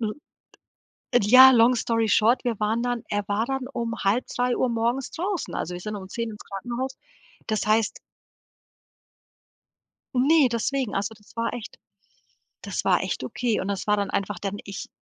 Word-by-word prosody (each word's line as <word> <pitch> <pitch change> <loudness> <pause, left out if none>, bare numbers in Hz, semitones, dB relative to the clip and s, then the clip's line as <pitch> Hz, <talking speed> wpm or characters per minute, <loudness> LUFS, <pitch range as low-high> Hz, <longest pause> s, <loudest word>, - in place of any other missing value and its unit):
l 215 -2 -2 1.1
ja, 255 +5 +9
long 240 +1 +5
story 230 -1 0
short, 225 +5 +3
wir 230 -4 -1
waren 220 +3 0
dann 245 -2 -2
er 205 0 -1
war 210 +3 0
dann 270 -1 -3
um 230 -1 -2
2:30 245 +4 +1
morgens 235 +3 -1
draußen. 370 +2 -3
Also, 180 - -3
wir 175 - -6
sind 210 +1 -5
um 190 -1 -8
10 230 0 -3
ins 210 - -11
Krankenhaus. 240 +7 -5 0.5
Das 215 -2 -1
heißt 215 0 +2 2.2
Ne, 285 +3 +5
deswegen, 250 +1 -1
also 205 +3 -1
das 210 - -22
war 230 +1 -1
echt 235 -3 -8 0.9
das - - -3
war - - +3
echt - - -3
okay 240 -3 -1
und 190 - -3
das 200 +1 -3
war 210 - +3
dann 200 -1 -1
einfach 195 -1 -2
dann 200 +1 -4
ich 200 -1 -7
230 Hz, 165 wpm, -25 LUFS, 205-245 Hz, 2.2 s, ja